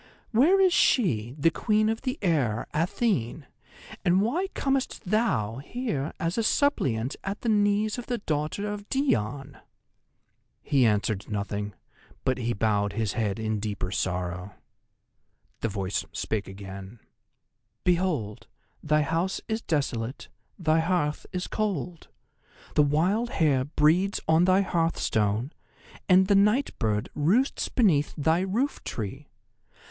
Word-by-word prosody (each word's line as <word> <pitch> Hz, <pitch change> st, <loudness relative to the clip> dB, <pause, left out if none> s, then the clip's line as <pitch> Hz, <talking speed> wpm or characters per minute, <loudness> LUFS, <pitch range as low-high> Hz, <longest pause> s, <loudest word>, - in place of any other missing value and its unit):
Where 300 Hz, -, +5 dB
is 375 Hz, -2 st, +5 dB
she, 125 Hz, -, +2 dB
the 165 Hz, +3 st, +3 dB
Queen 215 Hz, +2 st, +1 dB
of 225 Hz, +1 st, -1 dB
the 260 Hz, +1 st, -2 dB
Air, 135 Hz, -, +1 dB
Athene, 160 Hz, -, 0 dB, 0.6 s
and 180 Hz, +1 st, +4 dB
why 285 Hz, -, 0 dB
comest 270 Hz, -1 st, -1 dB
thou 180 Hz, -, 0 dB
here 155 Hz, -, -3 dB
as 170 Hz, +6 st, -1 dB
a -, -, +1 dB
suppliant 135 Hz, -, +1 dB
at 195 Hz, +1 st, -4 dB
the 235 Hz, -, -1 dB
knees 210 Hz, +1 st, +2 dB
of 240 Hz, -, -8 dB
the 245 Hz, -, -1 dB
daughter 155 Hz, 0 st, -2 dB
of 205 Hz, 0 st, -6 dB
Dione?" 140 Hz, -, -1 dB, 1.0 s
He 130 Hz, -4 st, +3 dB
answered 105 Hz, -1 st, 0 dB
nothing, 105 Hz, 0 st, -3 dB, 0.5 s
but 130 Hz, -1 st, 0 dB
he 120 Hz, -1 st, -1 dB
bowed 105 Hz, -2 st, 0 dB
his 110 Hz, -2 st, -1 dB
head 105 Hz, -4 st, -1 dB
in 110 Hz, -1 st, -2 dB
deeper 100 Hz, -3 st, -3 dB
sorrow. 90 Hz, 0 st, -3 dB, 1.0 s
The 115 Hz, -, -1 dB
voice 95 Hz, -1 st, -2 dB
spake 105 Hz, -2 st, -2 dB
again: 95 Hz, +2 st, -9 dB, 0.9 s
"Behold, 170 Hz, -, 0 dB, 0.3 s
thy 150 Hz, 0 st, +2 dB
house 165 Hz, +5 st, -1 dB
is 220 Hz, 0 st, -2 dB
desolate; 135 Hz, -, -2 dB, 0.3 s
thy 160 Hz, -3 st, +2 dB
hearth 160 Hz, -3 st, 0 dB
is 180 Hz, 0 st, -3 dB
cold. 180 Hz, -6 st, -3 dB, 0.7 s
The -, -, +4 dB
wild 175 Hz, +11 st, +2 dB
hare 140 Hz, -, +2 dB
breeds 160 Hz, +7 st, +2 dB
on 160 Hz, +2 st, +4 dB
thy 185 Hz, +1 st, +4 dB
hearthstone, 135 Hz, -, 0 dB, 0.6 s
and 185 Hz, +1 st, +6 dB
the 200 Hz, -, +3 dB
night 210 Hz, +7 st, +3 dB
bird 105 Hz, -2 st, 0 dB
roosts 195 Hz, -, +1 dB
beneath 165 Hz, -, +2 dB
thy 160 Hz, +3 st, +2 dB
roof 215 Hz, +10 st, -1 dB
tree. 105 Hz, -4 st, -5 dB
155 Hz, 130 wpm, -27 LUFS, -, 1.0 s, and